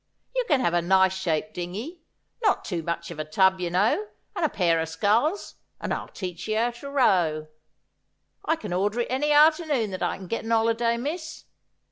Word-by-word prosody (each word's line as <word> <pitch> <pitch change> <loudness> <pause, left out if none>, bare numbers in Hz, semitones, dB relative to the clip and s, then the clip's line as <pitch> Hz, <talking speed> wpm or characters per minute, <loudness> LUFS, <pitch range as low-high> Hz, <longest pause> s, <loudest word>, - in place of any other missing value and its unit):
You - - +1
can 285 -7 +3
have 175 - +1
a 175 - +3
nice 190 +2 +4
shaped 190 +2 -2
dingey, 215 - -6 0.4
not 425 -3 +2
too 175 -4 -2
much 170 +1 -4
of 160 - -8
a - - -1
tub, 190 +5 +3
you 175 -1 -2
know, 210 - +1 0.3
and - - -2
a 315 - +3
pair 170 -7 +2
o' 160 - 0
sculls, 215 - 0 0.2
and - - -2
I'll - - -4
teach 180 -2 -6
you 225 +3 +1
to 240 +4 -9
row. 175 - +2 1.0
I 320 - +1
can 210 - -6
order 205 +6 0
it 240 - -4
any 290 +3 +1
arternoon 300 - +4
that 185 - -5
I - - -1
can 190 - -9
get 230 +6 -3
an 225 - -4
'oliday, 230 +1 +2
miss. 320 +5 -5
210 Hz, 195 wpm, -25 LUFS, 175-280 Hz, 1.0 s, nice